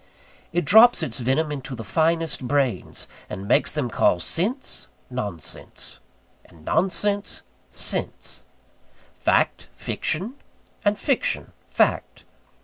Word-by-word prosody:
It 175 -2 0
drops 220 +2 +7
its 125 -6 -2
venom 135 +6 +1
into 135 -2 -5
the 115 - -6
finest 160 +2 0
brains; 140 -3 -1 0.2
and 95 +2 -6
makes 120 - +3
them 150 -5 -1
call 90 -6 +2
sense, 210 - -1 0.2
nonsense; 105 - -4 0.4
and 80 -3 -19
nonsense, 200 +4 0 0.3
sense; - - -3 0.8
fact, - - +1
fiction; 200 - -2 0.5
and 205 0 +2
fiction, 275 -4 0 0.2
fact. - - +1
155 Hz, 105 wpm, -24 LUFS, 125-195 Hz, 0.8 s, drops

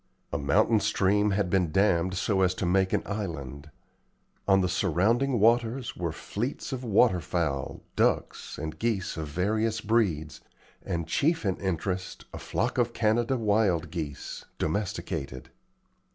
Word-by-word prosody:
A - - 0
mountain 105 +10 +3
stream 105 -1 +2
had 100 -1 +1
been 90 -4 +2
dammed 95 -1 +2
so 95 +1 +1
as 90 -1 +2
to 95 - -2
make 95 +1 +2
an - - +1
island. 80 -8 -5 0.8
On 95 -1 +5
the 90 - +1
surrounding 110 - +1
waters 120 +3 +2
were 85 -2 -2
fleets 115 - -4
of 130 -1 -4
water 110 -3 +4
fowl, 75 -5 -2
ducks - - 0
and 80 +1 -5
geese 110 -5 -1
of 80 -2 -4
various 110 +8 0
breeds, 100 -9 0 0.4
and, 85 -2 -2
chief 160 - +1
in 95 -2 +1
interest, 95 0 -3
a - - -6
flock 120 +3 -1
of 120 -1 +1
Canada 115 +4 +1
wild 100 -7 +1
geese, 75 -5 -5
domesticated. 80 -7 -3
95 Hz, 140 wpm, -28 LUFS, 85-110 Hz, 0.8 s, On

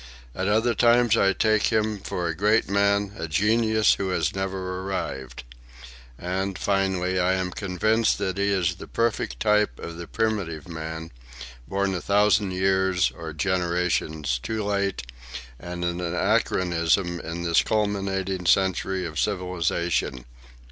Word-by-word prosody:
At 95 +7 -2
other 110 +3 +2
times 120 -1 +4
I 100 -3 +4
take 110 +2 +2
him 110 -2 0
for 90 -2 -3
a 80 - -2
great 105 +5 +2
man, 100 +1 +1
a 85 - -3
genius 110 +6 +3
who 95 -1 -2
has 90 - 0
never 95 -1 -3
arrived. 65 -10 -5 0.7
And, 95 +2 -3
finally, 95 -2 0
I 90 +1 +2
am 95 -1 -1
convinced 110 +5 +1
that 100 -1 -2
he 100 0 +2
is 95 -4 +1
the - - -9
perfect 115 -1 -1
type 105 - +2
of 85 0 -7
the 85 -1 -7
primitive 100 -9 -2
man, 80 0 -6 0.6
born 100 0 0
a 90 - -3
thousand 100 0 +3
years 95 0 +1
or 80 -1 -7
generations 85 -5 0
too 110 - -3
late 100 -5 -1 0.6
and 85 +3 -5
an 85 +1 -2
anachronism 90 -2 +1
in 85 +1 -5
this 85 -1 +3
culminating 95 -3 -1
century 95 0 +2
of 80 -3 -4
civilization. 85 -8 -1
95 Hz, 140 wpm, -25 LUFS, 85-100 Hz, 0.7 s, times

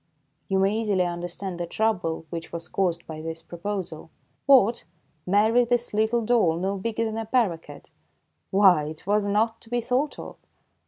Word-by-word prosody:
You 195 - +1
may 195 +2 +2
easily 210 -5 +1
understand 175 +1 -4
the 175 - -3
trouble 175 -6 -1
which 165 -1 -6
was 170 0 -6
caused 175 -3 -1
by 155 -1 -7
this 165 0 -6
proposal. 175 -2 -5 0.4
What, 245 -7 +5 0.4
marry 220 +5 +4
this 240 -1 -1
little 220 +2 +1
doll, 215 -9 +3
no 195 +3 -1
bigger 230 +2 -1
than 220 0 -3
a 225 - -4
paroquet! 210 -10 -1 0.7
Why, 190 -6 +5
it 155 +2 -8
was 205 +1 +1
not 220 +3 +1
to 225 - -15
be 245 0 0
thought 255 +5 -1
of - - -9
200 Hz, 165 wpm, -25 LUFS, 170-225 Hz, 0.7 s, What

